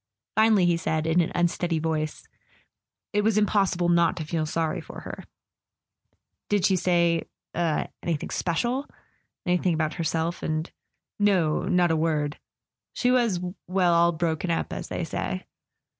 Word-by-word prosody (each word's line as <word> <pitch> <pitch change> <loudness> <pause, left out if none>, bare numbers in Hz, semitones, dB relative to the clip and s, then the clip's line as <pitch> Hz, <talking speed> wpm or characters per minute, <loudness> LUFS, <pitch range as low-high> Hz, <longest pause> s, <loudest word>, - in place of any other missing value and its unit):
Finally 215 -3 +5
he 175 -1 +3
said, 160 -2 -1
in 165 +2 +3
an 165 - -1
unsteady 175 -1 +1
voice: 155 -1 -2 0.9
"It 210 - +3
was 215 0 +2
impossible 195 -4 +2
not 170 -1 +3
to 160 - -4
feel 155 0 -1
sorry 160 0 -1
for - - -10
her." - - -8 1.2
"Did 205 -3 +2
she 190 - +4
say—er—anything 170 -2 -1
special? 240 - -1 0.6
Anything 180 -1 +2
about 155 -1 0
herself 165 +1 -1
and 155 +1 -2 0.3
" - - -61
"No; 185 -7 +2
not 180 -2 +3
a - - +3
word. 155 -2 0 0.5
She 250 - +1
was—well, 185 -5 +1
all 170 0 +5
broken 165 +1 -1
up, 165 - -1
as - - -5
they - - -3
say." - - -3
170 Hz, 140 wpm, -26 LUFS, 160-185 Hz, 1.2 s, Finally